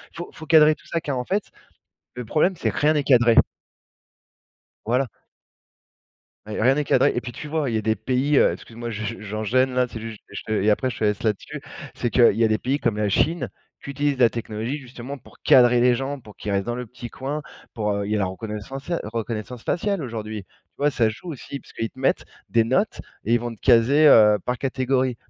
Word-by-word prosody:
Faut 170 Hz, +1 st, -6 dB
faut 160 Hz, -, -11 dB
cadrer 155 Hz, -1 st, +6 dB
tout -, -, -23 dB
ça 165 Hz, -, -2 dB
car 140 Hz, -4 st, -3 dB
en 125 Hz, -, -3 dB
fait, 200 Hz, +6 st, 0 dB, 0.7 s
le 125 Hz, -, -6 dB
problème, 155 Hz, -, +2 dB
c'est: -, -, -1 dB
rien 150 Hz, +2 st, +3 dB
n'est 150 Hz, -, +1 dB
cadré. 120 Hz, -4 st, +5 dB, 1.5 s
Voilà. 125 Hz, +4 st, +1 dB, 1.4 s
Rien 110 Hz, +5 st, +2 dB
n'est 150 Hz, -, 0 dB
cadré -, -, +3 dB
et 120 Hz, -, 0 dB
puis, 120 Hz, -, -7 dB
tu 120 Hz, -, -8 dB
vois? 150 Hz, -3 st, -1 dB
Il -, -, -3 dB
y -, -, +2 dB
a -, -, -3 dB
des 110 Hz, +1 st, +1 dB
pays, 130 Hz, +6 st, 0 dB
heu, -, -, +5 dB
excuse-moi, 120 Hz, +1 st, -8 dB
je 110 Hz, +1 st, -5 dB
j'enchaine, 110 Hz, +5 st, 0 dB
là, 125 Hz, 0 st, +2 dB
c'est 115 Hz, -, -8 dB
juste, 110 Hz, -1 st, -8 dB
heu, -, -, -18 dB
je -, -, -5 dB
te 110 Hz, -, -5 dB
et 105 Hz, 0 st, +2 dB
après 130 Hz, +5 st, +1 dB
je -, -, -7 dB
te -, -, -1 dB
laisse 105 Hz, -1 st, 0 dB
là-dessus. 105 Hz, -3 st, -2 dB, 0.3 s
C'est 120 Hz, -, -2 dB
qu'il 120 Hz, 0 st, +5 dB
y 115 Hz, -, +1 dB
a 115 Hz, -, +5 dB
des 110 Hz, 0 st, +1 dB
pays 135 Hz, +3 st, -1 dB
comme 105 Hz, -, 0 dB
la 105 Hz, -1 st, 0 dB
Chine 160 Hz, -, +1 dB, 0.3 s
qui -, -, -7 dB
utilisent 140 Hz, 0 st, -1 dB
la 120 Hz, -2 st, +6 dB
technologie 115 Hz, +3 st, -4 dB
justement 130 Hz, +1 st, -8 dB
pour -, -, -19 dB
cadrer 120 Hz, -1 st, +6 dB
les 125 Hz, 0 st, +5 dB
gens 135 Hz, +3 st, -3 dB
pour 105 Hz, -4 st, -15 dB
qu'ils 105 Hz, -, -5 dB
restent 100 Hz, -1 st, 0 dB
dans 120 Hz, -, -2 dB
le 125 Hz, 0 st, -5 dB
petit 120 Hz, +1 st, -9 dB
coin, 140 Hz, +5 st, -4 dB, 0.3 s
pour, 105 Hz, -3 st, -1 dB
heu, 100 Hz, 0 st, -2 dB
il 105 Hz, -, -3 dB
y -, -, +2 dB
a -, -, 0 dB
la 100 Hz, -, +1 dB
reconnaissance 105 Hz, +7 st, -6 dB
ciale 170 Hz, -1 st, -2 dB
reconnaissance 115 Hz, +2 st, -5 dB
faciale, 195 Hz, 0 st, -1 dB
aujourd'hui. 110 Hz, -4 st, -5 dB
Tu -, -, -46 dB, 0.3 s
vois? 145 Hz, +1 st, +2 dB
Ça 115 Hz, -5 st, +2 dB
joue 110 Hz, +11 st, -7 dB
aussi, 140 Hz, -1 st, -7 dB
parce -, -, -18 dB
qu'ils 115 Hz, -, -3 dB
te -, -, -21 dB
mettent 135 Hz, -, +1 dB, 0.2 s
des 115 Hz, -1 st, +3 dB
notes 190 Hz, -, 0 dB, 0.2 s
et 115 Hz, -, +2 dB
ils 120 Hz, -, +2 dB
vont 120 Hz, 0 st, -4 dB
te -, -, -24 dB
caser, 140 Hz, +7 st, +5 dB
heu, 105 Hz, -5 st, +7 dB
par 125 Hz, 0 st, -2 dB
catégorie. 130 Hz, -1 st, 0 dB
120 Hz, 230 wpm, -23 LUFS, 110-140 Hz, 1.5 s, heu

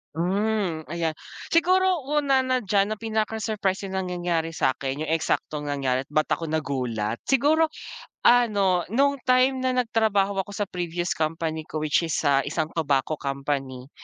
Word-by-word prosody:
Hmm, 190 Hz, -1 st, -1 dB
ayan. 165 Hz, 0 st, -1 dB, 0.4 s
Siguro, 370 Hz, +2 st, +3 dB
una 285 Hz, -2 st, +2 dB
na 255 Hz, -1 st, 0 dB
diyan 200 Hz, 0 st, +2 dB
na 215 Hz, -, -2 dB
pinaka-surprising 215 Hz, -3 st, -2 dB
na 190 Hz, -, -1 dB
nangyari 175 Hz, -3 st, -2 dB
sa'kin, 135 Hz, -1 st, 0 dB
'yong 160 Hz, -, -3 dB
eksaktong 155 Hz, -2 st, -1 dB
nangyari 135 Hz, -2 st, -1 dB
ba't 155 Hz, +1 st, 0 dB
ako 165 Hz, -, 0 dB
nagulat, 125 Hz, -8 st, -2 dB
siguro, 300 Hz, +5 st, +3 dB, 0.6 s
ano 205 Hz, -7 st, +3 dB
no'ng 280 Hz, +2 st, +3 dB
time 255 Hz, +1 st, +4 dB
na 255 Hz, 0 st, 0 dB
nagtrabaho 220 Hz, -5 st, +1 dB
ako 195 Hz, +1 st, -3 dB
sa 205 Hz, -1 st, -3 dB
previous 175 Hz, 0 st, -3 dB
company 160 Hz, 0 st, -2 dB
ko 155 Hz, -, -4 dB
which 155 Hz, +2 st, +2 dB
is 160 Hz, -, -2 dB
sa 140 Hz, -2 st, +2 dB
isang 155 Hz, +2 st, -2 dB
tobacco 150 Hz, -1 st, 0 dB
company, 135 Hz, -2 st, -3 dB
180 Hz, 145 wpm, -25 LUFS, 155-220 Hz, 0.6 s, time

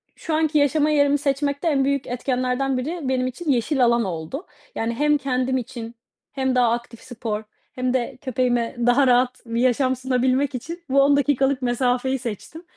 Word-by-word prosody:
şu 325 Hz, -, -5 dB
anki 315 Hz, -1 st, +1 dB
yaşama 295 Hz, +1 st, +3 dB
yerimi 285 Hz, -1 st, +3 dB
seçmekte 285 Hz, +2 st, -1 dB
en 275 Hz, -3 st, +2 dB
büyük 280 Hz, -1 st, -1 dB
etkenlerden 255 Hz, +1 st, -1 dB
biri 320 Hz, +8 st, -3 dB
benim 255 Hz, -1 st, 0 dB
için 285 Hz, +4 st, -2 dB
yeşil 255 Hz, +1 st, +2 dB
alan 235 Hz, 0 st, +3 dB
oldu. 175 Hz, -, -5 dB, 0.3 s
Yani, 230 Hz, +1 st, -1 dB
hem 295 Hz, +2 st, +3 dB
kendim 260 Hz, -1 st, -1 dB
için 235 Hz, -1 st, -6 dB, 0.4 s
hem 265 Hz, -2 st, -1 dB
daha 240 Hz, -2 st, +4 dB
aktif 235 Hz, -1 st, -4 dB
spor 220 Hz, -3 st, -5 dB, 0.3 s
hem 255 Hz, 0 st, -1 dB
de 250 Hz, 0 st, -2 dB
köpeğime 245 Hz, -3 st, 0 dB
daha 260 Hz, +2 st, +4 dB
rahat 250 Hz, 0 st, +2 dB
bir 230 Hz, +1 st, -2 dB
yaşam 255 Hz, +1 st, +2 dB
sunabilmek 260 Hz, +2 st, 0 dB
için 335 Hz, +8 st, -7 dB
bu 275 Hz, +1 st, +4 dB
10 280 Hz, +1 st, +4 dB
dakikalık 275 Hz, -1 st, +1 dB
mesafeyi 250 Hz, +1 st, 0 dB
seçtim 245 Hz, -, -7 dB
260 Hz, 170 wpm, -22 LUFS, 245-280 Hz, 0.4 s, daha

